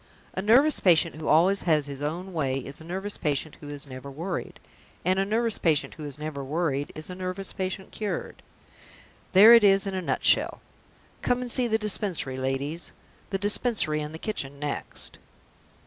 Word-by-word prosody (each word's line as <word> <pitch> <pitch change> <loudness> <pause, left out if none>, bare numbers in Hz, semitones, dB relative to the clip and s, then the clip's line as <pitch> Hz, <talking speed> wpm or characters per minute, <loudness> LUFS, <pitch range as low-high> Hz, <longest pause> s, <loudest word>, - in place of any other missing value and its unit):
A 190 - -2
nervous 255 +9 +4
patient 175 -4 +4
who 155 - -6
always 180 +6 +4
has 155 -4 +2
his 140 -1 -7
own 175 +6 -4
way 135 -5 0
is 135 +3 -7
a - - -10
nervous 190 +5 -4
patient 150 -1 -1
who 145 - -9
is 145 -1 -7
never 130 0 -9
worried; 170 +6 -5 0.5
and 185 +1 +2
a 195 - +2
nervous 225 +2 0
patient 160 -2 +1
who 155 - -8
is 145 -1 -6
never 150 -2 -5
worried 145 -1 -1
is 155 +3 -7
a - - -5
nervous 185 +1 -5
patient 190 0 -4
cured. 210 -2 -4 0.9
There 210 +5 +10
it 230 -2 +8
is 195 0 +5
in 195 - -3
a 190 - -2
nutshell! 170 - +2 0.6
Come 245 0 +1
and 245 -1 -2
see 250 -1 +3
the 220 -1 +2
Dispensary, 195 -10 -1
ladies; 135 +5 -3 0.4
the 195 - 0
Dispensary 205 -6 0
and 150 0 -5
the 160 - -7
kitchen 145 -8 -4
next!" 145 0 -4
170 Hz, 180 wpm, -26 LUFS, 145-195 Hz, 0.9 s, There